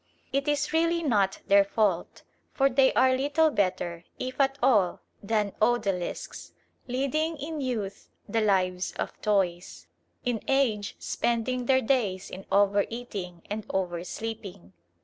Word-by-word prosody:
It 275 +1 0
is 295 +1 0
really 335 +1 +2
not 205 -9 +1
their 200 0 +6
fault; 200 -3 -1 0.3
for 275 0 +3
they 265 +1 +5
are 260 0 +4
little 295 +4 +2
better, 180 -5 -1
if 255 +2 -2
at 270 0 +2
all, 210 -9 +3 0.2
than 210 -1 0
odalisques, 210 -6 -1 0.3
leading 275 +6 -1
in 300 +1 -5
youth 225 -7 -4 0.2
the 225 +2 0
lives 185 -3 +1
of - - -4
toys; 175 - 0 0.4
in 240 -3 0
age 235 -7 +1
spending 240 +1 -1
their 260 -1 +4
days 210 -7 0
in 190 +1 -9
over 200 0 +4
eating 195 -8 -6
and 210 +1 -4
over 175 -3 -2
sleeping. 200 - -7
220 Hz, 135 wpm, -27 LUFS, 195-265 Hz, 0.4 s, their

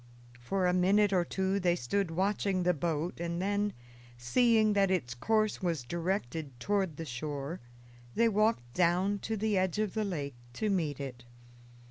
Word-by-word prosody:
For 185 +10 -1
a 180 - +3
minute 195 +3 +3
or 180 -2 +3
two 190 +3 -1
they 175 -2 +2
stood 180 +6 -1
watching 190 +1 0
the 180 0 +3
boat, 165 +1 -2
and 170 0 -2
then, 205 +2 0 0.5
seeing 215 - +3
that 200 -1 +3
its 165 -10 0
course 215 - +1
was 170 -7 -1
directed 160 -4 -3
toward 190 -1 0
the 165 - -5
shore, 145 +4 -4 0.6
they 230 - +4
walked 215 - +1
down 185 +4 +2
to 220 +3 -3
the 210 -1 +1
edge 185 -1 0
of 215 -3 0
the 220 - 0
lake 150 -9 -3 0.2
to 210 - -1
meet 155 -8 -1
it. 125 -3 -6
180 Hz, 165 wpm, -31 LUFS, 155-205 Hz, 0.6 s, they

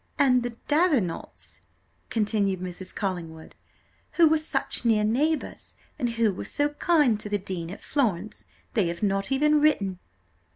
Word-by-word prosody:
'" - - -41
"And 250 -1 +4
the 240 -1 -5
Davenants," 290 - 0 0.5
continued 205 -4 0
Mrs. 185 0 -7
Collingwood, 170 -5 -5 0.6
"who 335 -2 +6
were 315 0 +3
such 310 - -1
near 220 -3 +3
neighbours, 290 +9 -1 0.2
and 240 - 0
who 230 -3 +1
were - - -6
so 290 0 0
kind 295 -7 +2
to 210 - -7
the 205 - +1
dean 185 -4 -5
at 195 - -9
Florence; 215 - -1 0.3
they 205 -6 +2
have 170 +3 -5
not 195 +3 0
even 300 +2 +3
written!" 200 -12 +2
215 Hz, 155 wpm, -26 LUFS, 190-290 Hz, 0.6 s, who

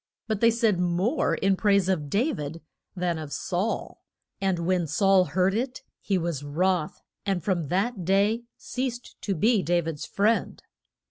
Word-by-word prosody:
But 215 -3 -2
they 230 - +6
said 225 -5 +2
more 180 - +1
in 195 0 +2
praise 200 -2 +3
of 160 -7 0
Da 240 - +2
vid 150 - -6 0.3
than 175 -3 -1
of 155 -2 -7
Saul, 185 +8 -2 0.4
and 185 -3 0
when 180 -2 +1
Saul 190 +4 +4
heard 180 +5 +1
it 250 +4 -3 0.2
he 195 - 0
was 165 -5 -2
wroth, 170 +3 0 0.2
and 195 -5 -1
from 175 -6 0
that 195 - -1
day 200 +6 +2
ceased 250 -1 -4
to 195 - -1
be 215 +5 +3
Da 175 0 +2
vid's 160 -3 -5
friend. 215 +3 0
190 Hz, 160 wpm, -26 LUFS, 170-215 Hz, 0.4 s, they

